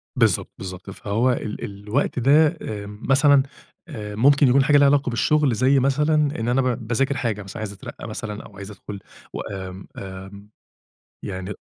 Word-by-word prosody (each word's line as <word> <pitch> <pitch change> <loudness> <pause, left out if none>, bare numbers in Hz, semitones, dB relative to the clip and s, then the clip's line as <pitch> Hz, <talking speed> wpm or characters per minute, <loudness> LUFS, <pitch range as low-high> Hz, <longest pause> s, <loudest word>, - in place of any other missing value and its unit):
بالضبط، - - +2
بالضبط. 90 0 -8
فهو 110 +6 0
ال 110 -3 -4
الوقت 105 +7 -2
ده 145 +5 +4
آمم، 105 0 -7
مثلًا، 140 0 +5 0.4
آآ، 105 -8 -7
ممكن 140 +4 +5
يكون 135 +2 +5
حاجة 145 +1 +5
ليها 140 0 +6
علاقة 140 -2 +3
بالشُغل، 140 +2 +2
زي 135 +3 +3
مثلًا 150 +4 +2 0.3
إن 115 - -2
أنا 130 +2 +2
ب 125 -3 -2
باذاكر 135 +4 0
حاجة 105 -4 -2
مثلًا، 95 +2 -9
عايز 110 -2 -4
أترقّى 95 - -9
مثلًا 105 -1 -6
أو 100 - -15
عايز 100 +1 -8
أدْخُل 100 -1 -9 0.3
و - - -4
آمم، 95 -1 -7
آمم، 95 +1 -9 0.7
يعني 95 0 -5
115 Hz, 170 wpm, -23 LUFS, 100-135 Hz, 0.7 s, ليها